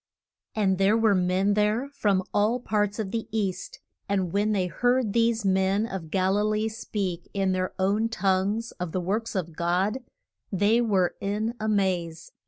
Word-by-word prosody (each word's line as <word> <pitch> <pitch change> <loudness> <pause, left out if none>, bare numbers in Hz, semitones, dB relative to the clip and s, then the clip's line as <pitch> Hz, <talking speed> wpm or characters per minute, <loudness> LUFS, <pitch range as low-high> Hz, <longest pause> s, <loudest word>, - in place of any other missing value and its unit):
And 195 -3 +1
there 200 +3 +4
were 220 -2 +4
men 185 +2 +2
there 210 +5 +1
from 200 -8 +1
all 215 +4 +2
parts 210 -3 -1
of 210 -4 -3
the 230 -1 -3
East, 220 - -3 0.3
and 190 -4 0
when 205 +2 +1
they 195 -3 +1
heard 245 +3 +1
these 230 -2 +2
men 190 +2 +2
of 190 -7 -6
Gal 190 +3 +1
i - - +2
lee 215 +1 0
speak 195 -6 -4
in 195 -1 +1
their 185 0 -2
own 205 +4 +1
tongues 200 +2 0
of 180 -2 -4
the 185 - 0
works 210 +6 -2
of 170 -4 -3
God, 185 +8 0 0.5
they 205 +4 +3
were 195 -6 +2
in 210 +3 -1
a 215 0 -1
maze. 180 -6 -1
200 Hz, 175 wpm, -26 LUFS, 185-220 Hz, 0.5 s, there